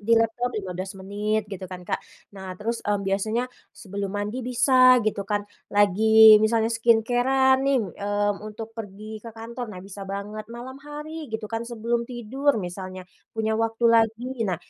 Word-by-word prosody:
di 230 +3 +3
laptop 225 +2 +1
15 185 -1 -5
menit 205 +3 -2
gitu 185 -1 -6
kan 180 -1 -8
Kak. - - -2 0.3
Nah 190 -2 -8
terus, 230 +3 -3
mmm, 205 -1 -1
biasanya 215 +5 0 0.2
sebelum 200 -1 -6
mandi 210 +5 -3
bisa 255 +1 +5
gitu 205 -2 -2
kan, 205 -1 0 0.2
lagi 215 +2 +7
misalnya 225 +1 +2
skincare-an, 245 +4 +3
mmm - - -2
nih, 275 - +4 0.2
mmm, 205 0 0
untuk 225 +1 -8
pergi 215 0 -8
ke 230 - -9
kantor, 235 +2 -6
nah - - -7
bisa 195 0 -9
banget. 205 +2 -5
Malam 245 +3 -8
hari 300 +1 -7
gitu 220 0 -4
kan, 225 - -1
sebelum 235 0 -1
tidur 255 +3 0
misalnya, 185 -1 -6 0.3
punya 220 0 0
waktu 225 +1 -1
lagi, 225 +1 +3 0.2
nah 180 - 0
220 Hz, 165 wpm, -25 LUFS, 200-235 Hz, 0.3 s, lagi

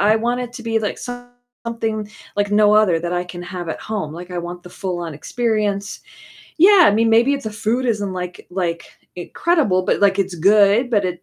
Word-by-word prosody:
I 210 +2 +4
want 240 +2 -1
it 245 -1 -6
to 245 - -8
be 225 -1 0
like 210 - -3
something 245 -3 -6 0.3
like 205 0 0
no 210 0 +4
other 205 -6 +4
that 175 +1 -4
I 180 0 -1
can 175 0 -9
have 180 -1 -6
at 160 - -4
home, 195 -8 -4
like, 180 +1 -9
I 180 - -4
want 175 +1 -6
the 180 - -12
full-on 175 -3 -4
experience. 210 +3 -2 0.6
Yeah, 380 +3 +7
I - - +5
mean, 225 +1 +2
maybe 240 +5 +4
if 275 - -5
the 220 - -4
food 225 +4 -1
isn't, 205 -4 -1
like 180 -1 -6
like, 175 -2 -2 0.3
incredible, 200 - +1
but, - - 0
like, 200 -1 +3
it's 190 -2 -3
good, 205 +7 +4
but 205 -4 +2
it 180 -1 -4
205 Hz, 210 wpm, -20 LUFS, 180-230 Hz, 0.6 s, Yeah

